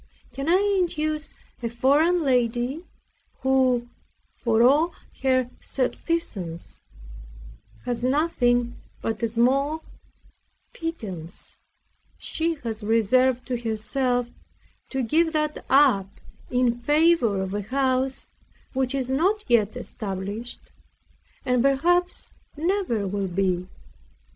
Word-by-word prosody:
Can 275 +4 -3
I 395 +3 +3
induce 310 -3 -1 0.3
a 235 - -2
foreign 295 +9 +3
lady, 250 +3 +1 0.6
who, 260 -2 +2 0.5
for 230 -2 +2
all 300 +7 +4 0.3
her 255 -2 +2
subsistence, 245 - -3 1.1
has 240 0 -2
nothing 245 -4 +1 0.3
but 225 - -2
a 230 - +1
small 275 +7 +1 0.9
pittance 200 - -6 0.6
she 330 +1 -1
has 225 -2 -4
reserved 240 +4 +3
to 250 - -2
herself, 245 +2 -1 0.6
to 265 -1 -1
give 320 +7 +2
that 305 -1 -1
up 260 -9 +5 0.4
in 245 -1 +1
favor 295 - +3
of 190 0 -3
a 205 - -1
house 260 +3 0 0.5
which 265 0 0
is 265 -2 -1
not 370 +11 +1
yet 235 -2 +2
established, 205 0 -6 0.7
and 250 -1 +2
perhaps 345 +7 +2 0.3
never 335 - 0
will 200 0 -2
be? 185 0 0
255 Hz, 100 wpm, -25 LUFS, 230-300 Hz, 1.1 s, up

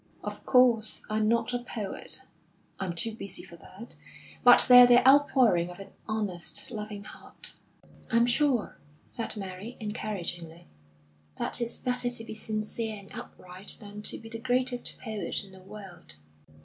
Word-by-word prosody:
"Of - - -6
course, 240 -4 +4
I'm 215 0 +1
not 230 +1 +1
a 245 - 0
poet, 220 -5 -4 0.6
I'm 190 -3 -2
too 220 +7 0
busy 200 -4 -7
for 170 - -12
that; 200 +7 -12 0.5
but 245 0 +9
they 250 -1 +11
are 245 - +9
the 245 +1 +6
outpouring 255 -11 +5
of 175 - -8
an 195 - -10 0.2
honest, 210 -2 -2
loving 210 -2 -6
heart." - - -7 0.6
"I'm 230 +1 +4
sure," 250 -1 +1 0.3
said 230 -2 -3
Mary, 195 +4 -7
encouragingly, 180 -6 -4 0.7
"that - - 0
it's 235 0 -2
better 250 -1 0
to 245 -2 -3
be 225 - -7
sincere 215 0 -2
and 200 -1 -12
upright 185 +2 -6
than 205 0 -9
to - - -4
be 225 - -12
the 225 0 -6
greatest 250 +1 0
poet 215 -3 -3
in 195 - -14
the 190 - -14
world." 190 - -10
215 Hz, 155 wpm, -28 LUFS, 195-245 Hz, 0.7 s, they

